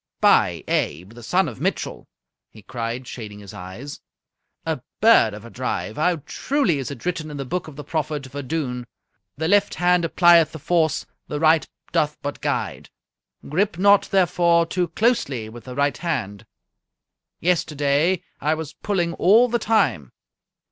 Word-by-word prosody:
"By - - +4
Abe, 90 +7 -1
the 120 +1 -12
son 180 +10 +1
of 115 -8 -8
Mitchell," - - -2 0.4
he 110 - -16
cried, 120 +2 -5
shading 105 -4 -8
his 100 -2 -11
eyes, 95 +11 -8 0.6
"a 160 -5 -2 0.2
bird 215 - +5
of 105 +2 -11
a 115 - -11
drive! 125 -3 -3
How 165 -1 +1
truly 225 - 0
is 135 - -4
it 140 -1 -9
written 165 -3 -2
in 145 - -7
the 135 - -4
book 180 +6 -3
of 155 - -10
the 150 - -7
prophet 150 -1 -2
Vadun, 130 -2 -4 0.5
'The 160 +2 -1
left 205 +2 +3
hand 180 0 +3
applieth 170 -1 +5
the - - -6
force, 160 +1 +1 0.2
the 150 - -3
right 160 -1 +4 0.2
doth 150 -3 +1
but 145 0 -4
guide. - - -2 0.6
Grip 185 +5 0
not, 200 +2 +4
therefore, 175 -3 +3
too 175 +1 -1
closely 165 - 0
with 120 +1 -12
the 125 -1 -8
right 140 -2 +1
hand!' 115 - -3 0.9
Yesterday 160 0 +1 0.2
I 155 +2 +1
was 155 -1 -6
pulling 175 -5 -1
all 220 +9 +5
the 240 +1 +1
time." 150 - +1
155 Hz, 160 wpm, -22 LUFS, 125-175 Hz, 0.9 s, bird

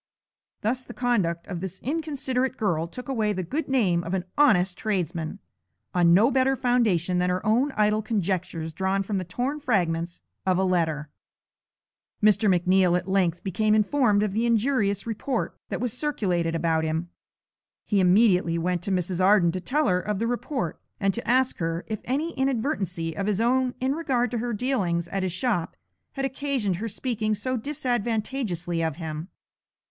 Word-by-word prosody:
Thus 245 +4 -1
the - - -11
conduct 195 -9 0
of 180 -3 -5
this 190 0 -6
inconsiderate 265 -4 -1
girl 170 -7 0
took 250 +10 -9
away 220 -6 0
the 185 -1 -3
good 285 - -3
name 195 -11 +2
of 175 +2 -2
an 180 -2 -2
honest 190 -11 +4
tradesman, 175 -6 -2 0.6
on 175 -1 +4
no 210 +9 +5
better 265 +1 +3
foundation 215 -9 +2
than 180 0 +1
her 180 0 -1
own 245 +7 +2
idle 210 0 +2
conjectures 185 -6 -2
drawn 190 +2 0
from 195 0 -2
the - - -3
torn 250 - -3
fragments 175 - -1 0.2
of 185 -1 +2
a 190 - +2
letter. 160 -5 0 1.1
Mr. 215 0 +4
McNeal 180 0 +3
at 180 +1 -5
length 180 -3 +1
became 215 +3 +1
informed 215 -1 +3
of 210 - 0
the 230 +3 +1
injurious 220 -4 +1
report 230 +3 -2
that - - -3
was 245 -1 -2
circulated 180 - 0
about 165 -1 +1
him. 160 +2 -2 0.8
He 205 - +1
immediately 180 -2 +4
went 175 +1 -1
to 195 - -3
Mrs. 185 0 0
Arden 190 -3 +5
to 185 +2 -4
tell 295 - 0
her 180 -1 +3
of 210 +1 -2
the 225 - -1
report, 245 - -3 0.2
and 195 -1 +1
to 235 - -6
ask 255 +1 +2
her 165 0 -2
if 215 -2 -4
any 295 +7 -1
inadvertency 220 - -1
of 195 +4 -2
his 210 -2 +1
own 250 +2 +2
in 260 +1 +1
regard 260 -7 0
to 240 - -1
her 240 +1 -2
dealings 200 -8 0
at 195 +2 -2
his 185 -1 -1
shop 185 -2 -1 0.4
had 270 -1 -2
occasioned 265 -8 -1
her 225 +4 -3
speaking 215 -1 -1
so 255 +4 -2
disadvantageously 225 - -2
of 160 -3 -1
him. 160 0 -5
205 Hz, 175 wpm, -26 LUFS, 175-245 Hz, 1.1 s, no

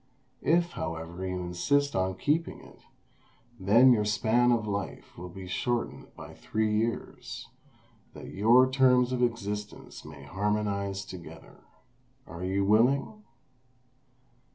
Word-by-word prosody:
If, 170 +1 +2
however, 85 +2 -5
you 90 0 -3
insist 140 +12 0
on 95 0 0
keeping 155 - -1
it, - - -16 0.8
then 115 +7 +6
your 105 -3 +1
span 110 +4 +2
of 115 -2 +1
life 100 -2 -5
will 90 +1 -8
be 95 +1 -9
shortened 120 +6 -3
by - - -10
three 110 -1 -1
years, 115 +2 -3 0.7
that - - -9
your 120 +6 +5
terms 130 -1 +3
of 125 -1 -1
existence 105 -3 -3
may 75 -2 -11
harmonize 100 +3 -2
together. 85 -3 -12 0.6
Are 85 +1 -8
you 95 +1 0
willing?" 130 - +2
105 Hz, 120 wpm, -28 LUFS, 95-125 Hz, 0.8 s, then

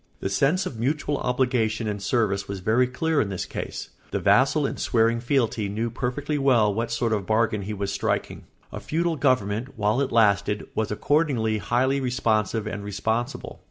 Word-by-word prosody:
The - - -2
sense 150 - +2
of 125 -11 -6
mutual 145 +3 0
obligation 125 -4 0
and 105 -1 -3
service 100 -2 0
was 100 -1 -5
very 110 +7 +2
clear 155 +4 0
in 100 - -2
this 95 -2 -3
case; - - -6 0.2
the - - -2
vassal - - +3
in - - -3
swearing 115 0 +2
fealty 115 -4 0
knew 110 +3 -2
perfectly 140 +5 -2
well 120 -7 +3
what 115 +3 -2
sort 115 -1 0
of 105 - +1
a - - -9
bargain 110 +1 +1
he 100 +2 -4
was 100 0 -3
striking. 100 - -2 0.3
A - - -6
feudal 165 +1 -1
government, 125 -3 0
while 105 +4 +1
it 140 - -1
lasted, 105 -2 +2
was 110 -1 -1
accordingly 115 -3 +1
highly 130 +6 +1
responsive 115 -4 0
and 105 -1 -5
responsible. 110 +4 -3
115 Hz, 180 wpm, -25 LUFS, 105-130 Hz, 0.3 s, vassal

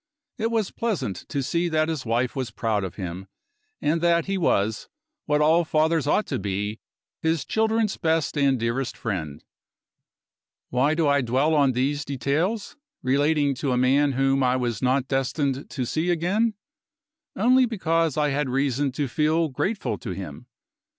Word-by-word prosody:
It 225 +1 0
was 225 -4 0
pleasant 200 - -3
to 140 -2 -2
see 170 +6 0
that 155 -1 +1
his 155 -7 -3
wife 120 +2 0
was 130 -3 -2
proud 110 -3 -1
of 95 - -5
him, 95 0 -6 0.5
and 160 +2 0
that 170 -1 +3
he 195 - -1
was, 110 - 0 0.4
what 150 0 +2
all 160 +3 +4
fathers 160 -1 +1
ought 210 - +2
to 130 - -3
be, 105 +2 -3 0.4
his 160 -3 0
children's 220 -1 +1
best 160 -3 0
and 140 -3 +2
dearest 115 +3 -2
friend. 80 -9 -4 1.3
Why 140 +5 +2
do 160 -2 +2
I 140 -1 +3
dwell 130 +6 +1
on 140 -4 +3
these 140 +4 0
details, 150 - -1 0.3
relating 145 +2 +2
to 135 -3 0
a - - +1
man 135 +3 +3
whom 135 +1 +2
I 125 0 +3
was 120 -3 -2
not 130 +1 +1
destined 135 +1 -1
to 130 -4 -3
see 160 +8 -1
again? 195 +7 +1 0.8
Only 250 +4 +4
because 165 - 0
I 150 -1 +2
had 145 -1 -1
reason 135 +1 0
to 140 +1 -1
feel 155 +5 +1
grateful 195 - -2
to 115 - -7
him. 85 -7 -8
145 Hz, 165 wpm, -24 LUFS, 125-165 Hz, 1.3 s, all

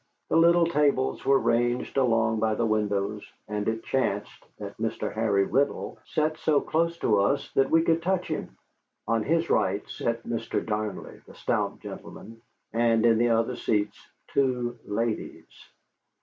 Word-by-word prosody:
The - - +1
little 170 +1 +5
tables 145 -5 +1
were 135 0 +4
ranged 120 0 0
along 115 -4 +2
by 110 0 +1
the 115 - 0
windows, 105 -1 -1 0.2
and 105 -1 -3
it 110 0 -1
chanced 105 -6 -2
that - - -7
Mr. - - -2
Harry 105 -3 +2
Riddle 140 +6 -1
sat 155 0 -1
so 150 -2 +3
close 170 +3 0
to 105 -10 +2
us 120 +8 0
that 135 - +2
we 165 0 +4
could 165 0 +2
touch 185 +1 0
him. - - -5 0.5
On 115 -1 +1
his 165 +7 0
right 100 +1 +1
sat 115 0 -3
Mr. 115 -1 -3
Darnley, 105 -1 -4
the - - -14
stout - - -1
gentleman, 115 +1 -10 0.3
and 115 -1 +3
in 115 -1 +4
the 120 0 +3
other 115 +2 +1
seats 105 -3 -1 0.3
two 125 -3 0
ladies. 110 +2 -3
115 Hz, 155 wpm, -27 LUFS, 110-140 Hz, 0.5 s, little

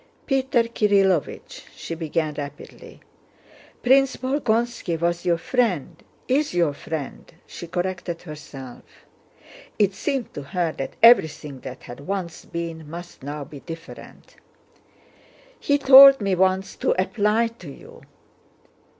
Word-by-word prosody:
"Peter 265 -3 +1
Kirílovich," 200 -7 0
she - - -7
began 160 -1 -2
rapidly, 145 -1 -9 0.8
"Prince 270 +1 +4
Bolkónski 240 - -1
was 170 +1 -1
your 170 -1 +2
friend—is 245 - -2
your 170 -4 +2
friend," 150 0 -7
she 170 - -9
corrected 175 -1 -4
herself. 145 -5 -10 1.0
(It 205 -2 +2
seemed 270 +2 -3
to - - -6
her 165 +4 -2
that 135 - -6
everything 150 - +4
that 130 0 -9
had 120 - -10
once 185 -4 -4
been 165 -2 -6
must 175 +2 -10
now 145 +2 -6
be 140 +1 -11
different.) 165 +3 -11 1.2
"He 285 - +1
told 275 0 +9
me 200 -3 0
once 190 +1 +1
to - - 0
apply 210 +3 +1
to 175 - -10
you..." 140 - -13
175 Hz, 115 wpm, -23 LUFS, 155-230 Hz, 1.2 s, told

